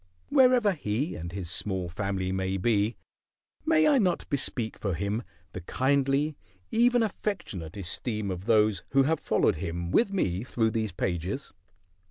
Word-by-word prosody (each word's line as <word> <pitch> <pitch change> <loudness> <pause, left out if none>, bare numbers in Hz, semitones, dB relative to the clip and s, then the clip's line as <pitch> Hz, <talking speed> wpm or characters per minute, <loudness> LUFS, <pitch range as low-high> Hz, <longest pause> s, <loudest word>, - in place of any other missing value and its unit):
Wherever 255 -6 +5
he 140 - -2
and 85 +1 -6
his 90 -2 -4
small 95 -1 -1
family 95 +1 -2
may 95 0 -1
be, 105 +2 +1 0.7
may 315 -1 +5
I 290 -3 +5
not 185 -5 +1
bespeak 125 -5 -1
for 100 -5 -1
him 100 +5 -1 0.3
the 95 - -6
kindly, 140 - +1 0.4
even 240 +1 +4
affectionate, 110 - -4
esteem 100 +2 -3
of 90 +1 -5
those 110 -3 +3
who 135 0 +6
have 160 +2 +1
followed - - +2
him 85 0 -4
with 230 -4 +3
me 95 - 0
through 115 -3 0
these 110 -2 -1
pages? 90 - -3
110 Hz, 150 wpm, -28 LUFS, 95-150 Hz, 0.7 s, who